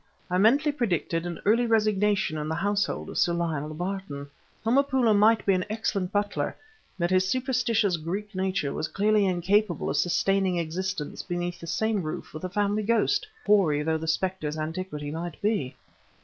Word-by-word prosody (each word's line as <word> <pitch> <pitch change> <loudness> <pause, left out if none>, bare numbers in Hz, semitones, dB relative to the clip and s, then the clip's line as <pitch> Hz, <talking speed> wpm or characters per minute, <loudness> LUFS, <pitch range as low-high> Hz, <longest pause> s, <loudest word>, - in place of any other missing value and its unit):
I 180 - +2
mentally 275 +9 +4
predicted 175 - -1
an 170 -2 -5
early 230 +4 +3
resignation 210 -5 +2
in 150 - -3
the 160 - -1
household 200 +3 -1
of - - -2
Sir 175 - +3
Lionel 155 -3 -2
Barton. 175 -6 -5 0.3
Homopoulo 260 -1 +3
might 220 +2 +4
be 195 - +4
an 185 -1 +1
excellent 200 -4 -1
butler, 205 0 -1 0.4
but 175 0 0
his 185 0 +3
superstitious 235 -6 +1
Greek 195 +7 -5
nature 185 -6 -1
was 155 - -2
clearly 205 +2 +2
incapable 185 +1 +1
of 145 - -1
sustaining 180 +3 +2
existence 170 -1 -3
beneath 175 -1 -4
the 170 - -9
same 220 +3 0
roof 155 -2 -6
with 155 - -8
a 185 - -2
family 205 +2 0
ghost, 230 - +1 0.2
hoary 165 -8 +3
though 160 +1 0
the 160 - -5
specter's 160 -2 -1
antiquity 155 -2 -4
might 165 0 -5
be. 200 - -1
190 Hz, 165 wpm, -27 LUFS, 165-210 Hz, 0.4 s, mentally